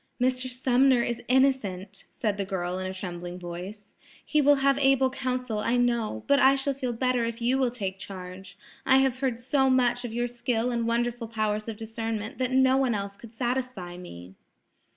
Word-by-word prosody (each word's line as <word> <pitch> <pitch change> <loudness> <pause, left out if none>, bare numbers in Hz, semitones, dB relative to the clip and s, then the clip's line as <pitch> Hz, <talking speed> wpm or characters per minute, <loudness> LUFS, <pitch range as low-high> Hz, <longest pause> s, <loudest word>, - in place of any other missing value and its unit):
"Mr. 255 +1 +1
Sumner 255 0 +3
is 240 0 -3
innocent," 250 -8 +1
said 210 -3 -2
the 200 - -1
girl 185 -2 -3
in 185 - -3
a 185 - -4
trembling 175 -1 -6
voice. 180 +4 -8 0.3
"He 305 - +2
will 290 +1 +6
have 275 0 +4
able 270 -1 +3
counsel, 250 -4 -2
I 235 +3 +1
know; 235 - 0
but 280 - +4
I 270 0 +6
shall 275 +1 0
feel 260 -2 -3
better 250 0 0
if 230 0 -3
you 245 +3 +1
will 260 -2 +2
take 195 -6 -4
charge. 185 0 -9 0.3
I 265 - +5
have 265 -1 +2
heard 255 -4 -1
so 265 +2 +2
much 245 -1 +2
of 240 - -5
your 240 +1 -1
skill 240 0 -1
and 235 -1 -1
wonderful 235 0 -1
powers 215 -1 -2
of 225 -2 -5
discernment 225 0 -4
that 255 -1 0
no 260 0 +4
one 260 -4 +2
else 200 0 -4
could 230 +2 -14
satisfy 245 -7 -3
me." 95 - -10
235 Hz, 195 wpm, -27 LUFS, 200-255 Hz, 0.3 s, will